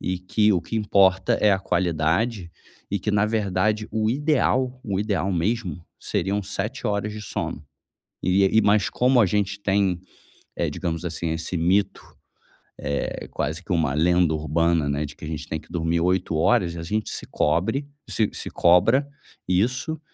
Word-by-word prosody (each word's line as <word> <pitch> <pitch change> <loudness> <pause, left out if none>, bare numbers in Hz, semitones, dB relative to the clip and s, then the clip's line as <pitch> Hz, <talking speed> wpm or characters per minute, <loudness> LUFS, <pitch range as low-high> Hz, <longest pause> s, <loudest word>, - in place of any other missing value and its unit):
e 90 0 -2
que 105 +3 +2
o 90 - +1
que 115 - -4
importa 100 0 +3
é 105 - +5
a 95 - +3
qualidade 90 +3 0 0.4
e 100 - -1
que 105 - -1
na 105 0 +2
verdade, 105 0 0
o 110 0 0
ideal 130 -1 +1
o 100 -3 -1
ideal 100 -2 -1
mesmo, 90 -2 -2
seriam 100 +4 -1
7 100 +6 -4
horas 105 0 -1
de 110 - -7
sono. 85 -6 -4 0.6
E 95 +2 +3
e 110 - +5
mas 105 0 +3
como 125 0 +3
a 110 - +5
gente 100 +1 -1
tem, 95 -3 +1 0.6
eh, - - 0
digamos 85 0 -3
assim, 85 -1 -3
esse 80 +2 -3
mito, 90 +5 +1 0.8
é 70 - -3
quase 80 +5 -3
que 95 - -2
uma 80 -5 +1
lenda 85 +1 +3
urbana, 80 0 +1
né, 70 +2 -1
de 75 - -10
que - - -9
a - - -6
gente 80 -1 -5
tem 80 - -3
que 75 - -20
dormir 85 0 0
8 90 -1 0
horas, 85 -1 +2
a 85 - -5
gente 105 +5 -2
se - - -5
cobre 105 - 0 0.2
se 110 -2 +1
se - - -6
cobra 115 +11 +4 0.4
isso 125 - 0
95 Hz, 175 wpm, -24 LUFS, 85-105 Hz, 0.8 s, é